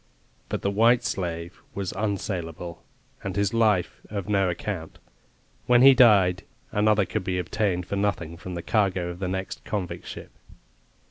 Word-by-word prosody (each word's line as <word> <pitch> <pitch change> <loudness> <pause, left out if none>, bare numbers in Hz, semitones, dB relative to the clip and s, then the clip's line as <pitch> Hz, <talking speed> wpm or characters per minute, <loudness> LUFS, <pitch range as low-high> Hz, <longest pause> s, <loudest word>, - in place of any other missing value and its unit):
But - - -3
the 100 - +1
white 115 +4 +4
slave 85 -4 -4
was 100 -2 -3
unsaleable, 90 -4 -3 0.4
and 100 -2 -4
his 100 0 +1
life 110 -6 +2
of 100 -3 -4
no 100 -3 +2
account. 90 -1 -5 0.7
When 125 0 +6
he 135 0 +10
died 100 -8 +5 0.3
another 105 -1 +3
could 90 - -3
be 90 -1 -1
obtained 90 0 -1
for 100 - -3
nothing 95 -5 -1
from 90 +1 -7
the 85 - -5
cargo 95 -5 +1
of 90 0 -7
the 95 - -2
next 95 +1 -4
convict 95 -4 -4
ship. - - -8
95 Hz, 155 wpm, -25 LUFS, 90-105 Hz, 0.7 s, he